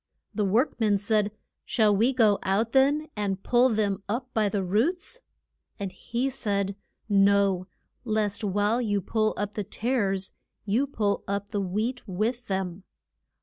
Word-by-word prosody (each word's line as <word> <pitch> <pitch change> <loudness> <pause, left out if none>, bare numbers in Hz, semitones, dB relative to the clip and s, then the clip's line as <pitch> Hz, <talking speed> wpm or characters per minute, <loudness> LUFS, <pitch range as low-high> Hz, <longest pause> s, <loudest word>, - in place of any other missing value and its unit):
The 210 - 0
work 230 +10 +1
men 210 -3 +3
said, 210 0 +1 0.3
Shall 215 -3 +3
we 230 +6 +3
go 220 -6 +3
out, 210 +4 0
then, 280 +4 +3
and 200 -2 -2
pull 250 +1 +4
them 205 -4 0
up 250 +4 -3
by 215 -2 +2
the 200 -1 -1
roots? 325 - 0 0.6
And 195 -2 -3
he 245 +7 -2
said, 200 -6 -1 0.3
No, 200 -2 +3 0.4
lest 215 -2 -1
while 205 +4 +1
you 205 -4 +1
pull 215 +3 0
up 205 0 -3
the 210 - -3
tares 200 -3 -1 0.3
you 230 +7 +1
pull 210 -7 -1
up 200 0 -2
the 205 -2 -1
wheat 220 +7 -2
with 225 +6 -2
them. 190 -1 -3
210 Hz, 150 wpm, -27 LUFS, 200-235 Hz, 0.6 s, pull